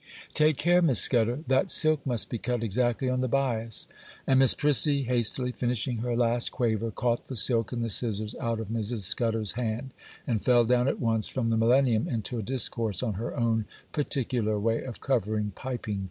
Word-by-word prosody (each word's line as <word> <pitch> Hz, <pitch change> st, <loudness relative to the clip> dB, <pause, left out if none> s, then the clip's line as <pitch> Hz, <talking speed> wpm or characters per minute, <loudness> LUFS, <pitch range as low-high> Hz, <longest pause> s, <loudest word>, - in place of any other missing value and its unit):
'Take 155 Hz, -2 st, +3 dB
care, 175 Hz, +4 st, +3 dB
Miss 145 Hz, -9 st, +5 dB
Scudder!—that 130 Hz, -, +2 dB
silk 155 Hz, -4 st, +2 dB
must 120 Hz, -7 st, 0 dB
be 120 Hz, -, -4 dB
cut 120 Hz, 0 st, -2 dB
exactly 120 Hz, +4 st, 0 dB
on 125 Hz, 0 st, 0 dB
the 130 Hz, -, 0 dB
bias;' 115 Hz, -4 st, -2 dB, 0.4 s
and 130 Hz, -1 st, +3 dB
Miss 135 Hz, -2 st, +6 dB
Prissy, 145 Hz, -1 st, +3 dB
hastily 125 Hz, +1 st, -1 dB
finishing 120 Hz, 0 st, -2 dB
her 120 Hz, +1 st, -2 dB
last 120 Hz, 0 st, +2 dB
quaver, 115 Hz, -2 st, -1 dB
caught 120 Hz, +2 st, -1 dB
the 130 Hz, -, -7 dB
silk 115 Hz, -1 st, +2 dB
and 120 Hz, -2 st, -2 dB
the 115 Hz, -, -2 dB
scissors 110 Hz, -1 st, -2 dB
out 115 Hz, -1 st, -1 dB
of 110 Hz, -2 st, -6 dB
Mrs. 115 Hz, 0 st, -3 dB
Scudder's 110 Hz, +2 st, 0 dB
hand, 120 Hz, +2 st, -4 dB, 0.3 s
and 115 Hz, -4 st, -1 dB
fell 120 Hz, -2 st, +4 dB
down 125 Hz, +2 st, +2 dB
at -, -, -1 dB
once 115 Hz, -2 st, 0 dB
from 115 Hz, -3 st, -2 dB
the -, -, +2 dB
Millennium 120 Hz, 0 st, +3 dB
into 115 Hz, +1 st, -3 dB
a -, -, -2 dB
discourse 115 Hz, -4 st, -2 dB
on 115 Hz, -4 st, -1 dB
her 110 Hz, +5 st, -5 dB
own 115 Hz, -2 st, +1 dB, 0.3 s
particular 125 Hz, -7 st, -1 dB
way 115 Hz, +2 st, 0 dB
of 125 Hz, -3 st, -8 dB
covering 110 Hz, -5 st, -1 dB
piping 120 Hz, -3 st, -5 dB
cord. -, -, -4 dB
120 Hz, 190 wpm, -27 LUFS, 110-130 Hz, 0.4 s, Miss